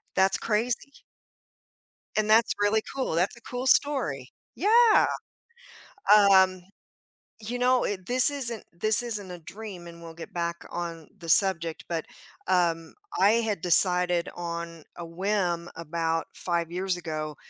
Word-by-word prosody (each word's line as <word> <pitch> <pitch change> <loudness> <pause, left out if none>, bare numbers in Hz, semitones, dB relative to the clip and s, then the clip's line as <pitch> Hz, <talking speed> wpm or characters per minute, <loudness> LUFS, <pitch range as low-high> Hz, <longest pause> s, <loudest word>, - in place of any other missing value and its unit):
That's 190 0 +3
crazy. 235 +5 -2 1.1
And 215 0 +1
that's 220 +1 +5
really 205 +1 +2
cool. 265 -10 -2
That's 180 +7 +1
a - - -15
cool 250 +2 -5
story, 200 - +1 0.2
yeah. 445 +4 +5 1.3
Um, 185 -1 +5 0.8
you 235 +3 -5
know, 250 0 +3
it 185 -3 -4
this 250 +2 +4
isn't 240 -6 -4
this 215 +7 +1
isn't 210 -5 -5
a 180 - -7
dream, 190 +1 -9
and 170 0 -12
we'll 165 -1 -10
get 165 - -10
back 170 -1 -2
on 170 -2 -5
the 165 -2 -10
subject, 170 -2 +2
but, 165 -2 -3 0.4
um, 170 -3 +1 0.3
I 200 - +6
had 225 -6 0
decided 180 0 +2
on 170 -2 -6
a 170 - -7
whim 175 -1 -1
about 165 0 -2
5 170 -2 -2
years 185 0 -1
ago, 155 -3 -5
180 Hz, 135 wpm, -27 LUFS, 170-220 Hz, 1.3 s, I